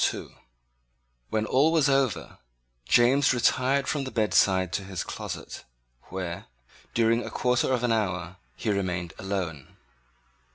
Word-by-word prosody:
When 110 0 0
all 140 +7 +3
was 160 -3 +3
over, 135 -4 0 0.5
James 130 +3 +4
retired 130 +3 +2
from 145 -3 -1
the 130 - -4
bedside 95 -5 +2
to 100 - -1
his 95 -3 -4
closet, - - -7 0.5
where, 90 -2 -5 0.5
during 115 +1 +3
a - - -6
quarter 125 +1 +1
of 125 -2 0
an 120 - +2
hour, 90 -5 -1 0.2
he 110 - -2
remained 90 -4 -2
alone. 90 -7 -4
110 Hz, 125 wpm, -27 LUFS, 95-130 Hz, 0.5 s, James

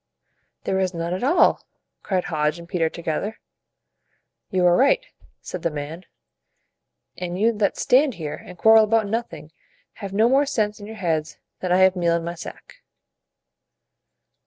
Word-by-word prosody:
"] - - -48
"There 190 - 0
is 185 -1 -1
none 170 +1 -2
at 185 - -3
all!" 290 +8 +3 0.4
cried 185 -3 -1
Hodge 155 -1 -1
and 170 0 -11
Peter 170 -3 0
together. 170 +6 -4 1.1
"You 185 -3 +1
are 175 0 +5
right," - - +3 0.4
said 180 - -7
the 170 - 0
man; 155 +4 -7 1.1
"and 180 0 -4
you 225 +3 +4
that 200 - +1
stand 265 -1 +3
here 155 -3 -6
and 180 - -12
quarrel 220 +3 +6
about 220 0 +2
nothing, 220 -7 -4 0.5
have 200 -2 -5
no 215 +4 +3
more 275 +3 +3
sense 215 -7 -1
in 205 - -9
your 220 - -8
heads 165 -5 -2 0.2
than 185 - -3
I 180 - +5
have 190 0 +5
meal 170 -2 +1
in 170 - -2
my 170 +1 -4
sack!" 175 - -11
185 Hz, 165 wpm, -23 LUFS, 170-220 Hz, 1.1 s, quarrel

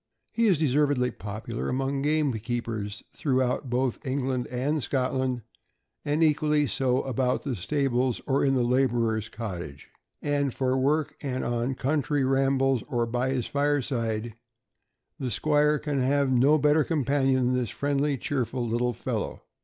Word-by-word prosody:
He 230 -1 +2
is 190 -6 +4
deservedly 145 -3 +2
popular 110 +3 -5
among 135 +2 -1
gamekeepers 120 -7 -1
through 130 -3 +1
out 125 +1 -2
both 125 +2 -1
England 130 -2 -1
and 140 +5 -1
Scotland, 130 0 -1 0.6
and 150 +3 +1
equally 150 -1 +3
so 130 +1 +1
about 130 -1 0
the 135 -3 -2
stables 130 +3 0
or 135 -1 +1
in 135 -1 +3
the 125 - +2
laborer's 120 -4 +1
cottage. 85 - -7 0.3
And 145 -2 0
for 130 -1 +1
work, 145 +3 +1
and 130 -3 -2
on 120 +2 -1
country 145 +1 0
rambles, 135 -1 +2
or 120 -1 0
by 120 +3 -1
his 130 -3 -1
fireside, 120 -6 -1 0.9
the 130 - -2
squire 150 +5 +2
can 145 -3 -2
have 140 +1 +2
no 135 +5 +5
better 150 +1 +3
companion 135 -4 +1
than - - +1
this 125 -3 0
friendly, 145 0 0
cheerful, 125 -2 -2
little 120 +2 0
fellow. - - -4
130 Hz, 145 wpm, -27 LUFS, 120-145 Hz, 0.9 s, no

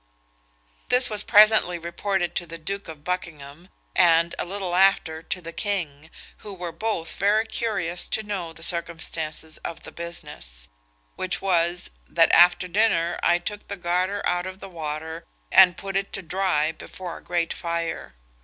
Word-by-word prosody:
This 250 -1 +3
was 210 -1 +2
presently 210 -5 +6
reported 175 +1 -2
to 175 - -2
the 165 +1 -7
Duke 195 +5 -4
of 155 -3 -10
Buckingham, 165 -2 -5 0.3
and, 170 -1 +4
a - - -1
little 190 -1 -4
after, 180 -4 +3
to 180 +3 -4
the 165 0 -8
king, 160 -7 -3 0.3
who 205 -3 -9
were 175 -2 -5
both 210 -3 -3
very 210 +3 +3
curious 195 -7 -2
to 220 - -1
know 195 -5 -4
the 165 0 -9
circumstances 165 -2 -2
of 165 - -7
the - - -9
business; 150 - -7 0.5
which 180 -1 -1
was, 175 - 0 0.2
that 165 - +4
after 175 +1 +6
dinner 175 -3 +2
I 175 - +4
took 205 +4 -6
the 200 - -5
garter 180 +3 -1
out 180 +1 0
of 190 0 -8
the 195 - -9
water, 160 0 -5 0.2
and 180 -2 +7
put 195 0 -6
it 195 0 -1
to 195 - -3
dry 175 -4 +1
before 175 +2 -8
a - - -15
great 170 -1 -1
fire. 170 - -4
175 Hz, 165 wpm, -24 LUFS, 165-195 Hz, 0.5 s, and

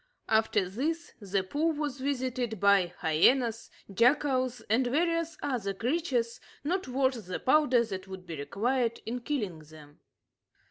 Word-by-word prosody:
After 220 -4 +2
this, 315 - -3
the 195 -2 -1
pool 305 - 0
was 290 -3 -3
visited 255 -5 -2
by 200 -3 +4
hyenas, 230 - +3 0.2
jackals, 255 +2 +2
and 245 +4 +1
various 330 +3 0
other 220 -8 -2
creatures 245 - -1 0.2
not 360 +4 -1
worth 260 -4 0
the 185 - -3
powder 260 -4 +4
that 190 -3 -6
would 190 -1 -9
be 170 -2 -6
required 230 - -1
in 240 +3 -3
killing 230 - -3
them. 150 -1 -15
245 Hz, 135 wpm, -29 LUFS, 195-280 Hz, 0.2 s, by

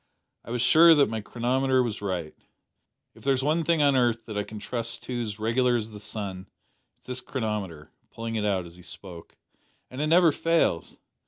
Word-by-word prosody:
I - - -13
was 120 0 -1
sure 165 +5 +7
that 140 -6 +4
my 110 -1 -3
chronometer 130 +4 +1
was 110 -4 -4
right. 90 -6 -3 0.8
If - - -18
there's 135 -1 +1
one 155 +3 +1
thing 160 -1 +2
on 140 -1 +4
earth 120 -3 +1
that 110 - -7
I 105 - 0
can 110 - -9
trust 115 +2 -3
to 125 -1 -3
as 105 -3 -4
reg'lar 120 +3 +2
as 110 -2 -2
the 105 - -9
sun, 100 -3 -5 0.5
it - - -40
is - - -24
this 130 0 -5
chronometer 105 - -4 0.2
(pulling 115 0 -6
it 110 - -1
out 95 -4 0
as 85 +1 -12
he - - -14
spoke), 90 -1 -11 0.5
and 130 +3 -5
it 150 - +1
never 170 +1 +5
fails. 165 - 0
115 Hz, 200 wpm, -26 LUFS, 105-130 Hz, 0.8 s, sure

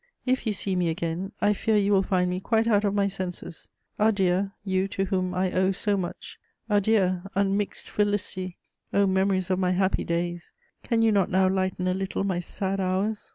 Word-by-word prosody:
If 255 -2 0
you 215 - +1
see 195 -1 -2
me 175 -2 +1
again, 170 +3 -3
I 210 - +4
fear 220 +2 0
you 205 0 +2
will 195 -1 +5
find 185 -2 +1
me 180 - -2
quite 225 +3 +1
out 210 -3 +3
of 200 -1 0
my 200 -1 +2
senses. 185 -3 -6 0.3
Adieu, 195 -3 +2 0.2
you 190 0 +1
to 195 0 -2
whom 185 -2 -1
I 185 0 0
owe 185 +1 +2
so 205 +2 0
much! 180 -3 -6 0.3
Adieu, 205 -3 +2
unmixed 200 +1 0
felicity! 200 -3 -1 0.3
O 200 0 +3
memories 190 -1 +1
of 185 - +1
my 185 -1 +2
happy 190 +1 +1
days, 175 +1 -3 0.3
can 230 -2 +1
you 225 - +4
not 200 -3 +2
now 190 +1 +3
lighten 185 -1 0
a 185 - +2
little 190 +1 -2
my 190 -3 0
sad 190 +2 -3
hours? 195 +3 -1
190 Hz, 195 wpm, -26 LUFS, 185-205 Hz, 0.3 s, will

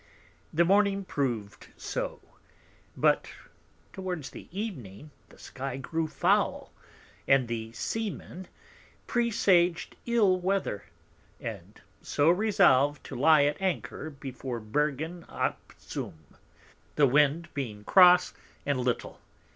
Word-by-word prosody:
The 170 +2 +3
Morning 200 +1 +3
prov'd 120 - -3
so; - - -4 0.8
but - - +2 0.6
towards 180 -6 -5
Evening 155 - -7 0.2
the - - -18
Sky 135 0 -6
grew 160 +4 -2
foul, 145 -3 0 0.5
and 135 -3 +4
the 115 -1 -4
Sea 225 - -2
men 185 -1 -9 0.6
presag'd 190 -7 +2
ill 210 -6 +3
Weather, 185 - -1 0.5
and - - -8 0.2
so 145 +3 +2
resolved 175 -8 +3
to - - -8
lie 150 +3 +5
at 145 +5 0
Anchor 180 -4 -2
before 135 -3 -6
Bergen 150 +8 -2
ap - - -3
Zoom, 80 -2 -8 0.6
the 145 - +5
Wind 150 +5 +3
being 110 -7 -5
cross 180 - +6 0.3
and 140 -2 0
little. 125 -1 -2
155 Hz, 105 wpm, -28 LUFS, 130-185 Hz, 0.8 s, cross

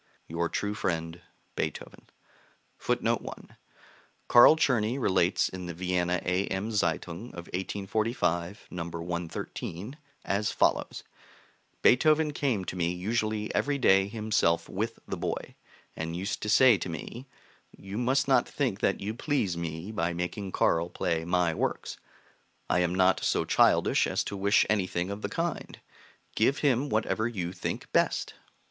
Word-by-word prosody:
Your 85 +1 -2
true 105 0 -2
friend, 85 -3 -3 0.3
BEETHOVEN. 80 - -5 0.7
[Footnote - - 0
1: - - -10 0.7
Carl 120 +6 +8
Czerny 125 -5 +1
relates 95 -6 +2
in 90 -1 -7
the 85 - -6
Vienna 90 0 0
A.M. 95 +3 -1
Zeitung 90 0 -1
of 85 0 -7
1845, 95 -1 -2
No. 85 -2 -4
113, 85 - -5 0.3
as 100 +2 0
follows: - - 0 0.8
"Beethoven 155 +3 +4
came 125 -11 -1
to - - -5
me 85 -1 0
usually 110 +3 -2
every 145 0 +1
day 95 -7 +4
himself 105 -6 +1
with 110 +4 -3
the - - -4
boy, - - -4 0.4
and 80 +1 -4
used 95 +3 -3
to 105 - -3
say 120 -1 +6
to - - -4
me, 120 +10 -7 0.4
'You 100 +3 -7
must 135 +3 +1
not 135 - +3
think 125 -9 -1
that 95 - 0
you 105 +2 -3
please 120 - -1
me 85 +3 -5
by 85 -5 -1
making 90 +3 -4
Carl 85 -1 +1
play 80 -2 -1
my 90 -1 +1
works; - - -3 0.7
I - - +2
am 90 0 +1
not 95 0 +3
so - - +1
childish - - +3
as - - 0
to 100 - -5
wish 100 +1 +3
anything 95 -3 0
of 100 +1 -6
the - - -3
kind. 170 0 -3 0.5
Give 130 +6 +2
him 140 0 +1
whatever 110 0 0
you 90 -7 -4
think 90 - -5
best.' - - +1
95 Hz, 145 wpm, -28 LUFS, 85-115 Hz, 0.8 s, Carl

